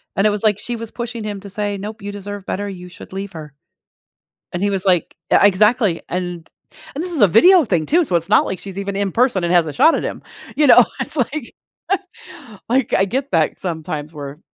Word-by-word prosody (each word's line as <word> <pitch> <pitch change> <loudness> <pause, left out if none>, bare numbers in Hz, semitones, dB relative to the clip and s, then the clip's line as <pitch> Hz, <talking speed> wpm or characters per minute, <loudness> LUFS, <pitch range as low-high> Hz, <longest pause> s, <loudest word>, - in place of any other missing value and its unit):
And 195 +2 +3
it - - +4
was, 205 0 -2
like, 210 -2 +2
she 240 - -4
was 230 -1 -7
pushing 235 -2 -5
him 205 -2 -4
to 200 - -10
say, 205 0 -3
"Nope. 210 +2 -7
You 205 +1 -5
deserve 205 0 -7
better. 205 +2 -3
You 180 -2 -9
should 180 - -13
leave 195 0 -5
her." 155 -3 -9 1.0
And 175 - -3
he 205 - +2
was 195 -1 -2
like 180 -3 +1 0.2
uh, - - +6
exactly. 205 -1 +3
And 175 -2 -4 0.5
and 300 +5 -3
this 365 - -3
is 315 - -2
a - - +9
video 345 - +6
thing 175 -9 0
too, 345 +2 +3
so 185 - -3
it's 165 +1 -2
not 210 - +4
like 190 - -4
she's 195 -1 -8
even 200 0 -3
in 200 -1 0
person 235 -5 +2
and 170 - 0
has 175 -2 +4
a 150 - -4
shot 320 - +5
at - - -3
him. - - -5 0.3
You 300 - +4
know, - - +8 0.2
it's - - -3
like 275 0 -2 1.1
like, 255 +1 +1
I 190 - +4
get 265 +7 -2
that 160 -3 +1
sometimes 155 -3 -4
where 145 -1 -8
200 Hz, 230 wpm, -19 LUFS, 180-225 Hz, 1.1 s, a